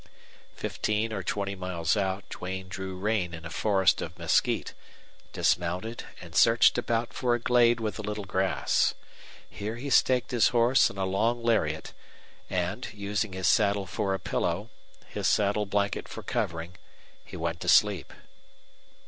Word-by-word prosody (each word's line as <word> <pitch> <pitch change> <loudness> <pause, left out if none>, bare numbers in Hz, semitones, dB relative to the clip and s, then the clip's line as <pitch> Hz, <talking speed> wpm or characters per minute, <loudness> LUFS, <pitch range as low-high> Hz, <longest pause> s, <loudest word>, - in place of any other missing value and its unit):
Fifteen 110 +1 -2
or 100 - -2
twenty 100 +1 -2
miles 90 -3 -1
out 95 -1 -2
Duane 95 +1 -6
drew 95 0 -6
rein 95 -3 -1
in 80 0 -11
a 80 - -7
forest 95 +1 +2
of - - -6
mesquite, - - +1 0.6
dismounted, 90 +7 -1
and 85 -1 -11
searched 115 +4 +5
about 115 -1 -1
for 120 -2 +1
a - - -3
glade 120 0 +4
with 110 -2 -3
a - - -2
little 105 -1 -4
grass. 95 0 +1 0.5
Here 105 +3 -5
he 135 +4 -6
staked 130 -2 +3
his 120 -5 +4
horse 120 +2 +4
on 100 - -11
a 95 - 0
long 115 +5 0
lariat; 80 -10 0 0.6
and, 90 +6 -2
using 105 0 -3
his 95 -2 -1
saddle 100 -1 +3
for 95 0 -1
a - - -5
pillow, 90 +4 -2 0.4
his - - -2
saddle 105 0 +2
blanket 100 -1 -1
for - - -8
covering, 85 +2 -3 0.5
he - - -10
went 85 0 -3
to 90 - -2
sleep. 100 -6 +4
100 Hz, 155 wpm, -28 LUFS, 90-110 Hz, 0.6 s, searched